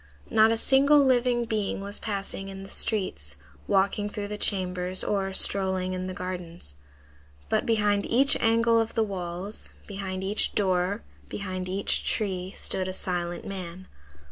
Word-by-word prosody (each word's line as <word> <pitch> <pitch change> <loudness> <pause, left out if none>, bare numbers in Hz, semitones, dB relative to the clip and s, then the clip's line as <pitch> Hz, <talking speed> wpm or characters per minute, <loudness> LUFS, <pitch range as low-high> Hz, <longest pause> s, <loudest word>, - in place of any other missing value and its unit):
Not 220 0 +5
a 225 - +1
single 280 +5 +4
living 245 -2 +2
being 215 -4 -2
was 200 +1 -5
passing 195 -2 -4
in 195 0 -8
the 195 - -9
streets, 75 - -1 0.3
walking 200 +1 +1
through 205 -1 -5
the 210 - -4
chambers 185 -2 +2
or 195 -2 -1
strolling 190 -1 +5
in 185 0 -4
the 185 - -5
gardens. 175 - -4 0.8
But - - 0
behind 210 -3 +1
each 270 +4 +5
angle 230 0 +3
of 225 0 -2
the 225 - +2
walls, 190 0 -5 0.2
behind 190 -2 -5
each 200 +3 0
door, 190 +1 0 0.3
behind 185 -2 -5
each 195 +2 -1
tree, 190 -4 -2
stood 185 -1 -1
a 185 - -4
silent 175 -2 -3
man. 185 -1 -7
195 Hz, 150 wpm, -26 LUFS, 185-215 Hz, 0.8 s, Not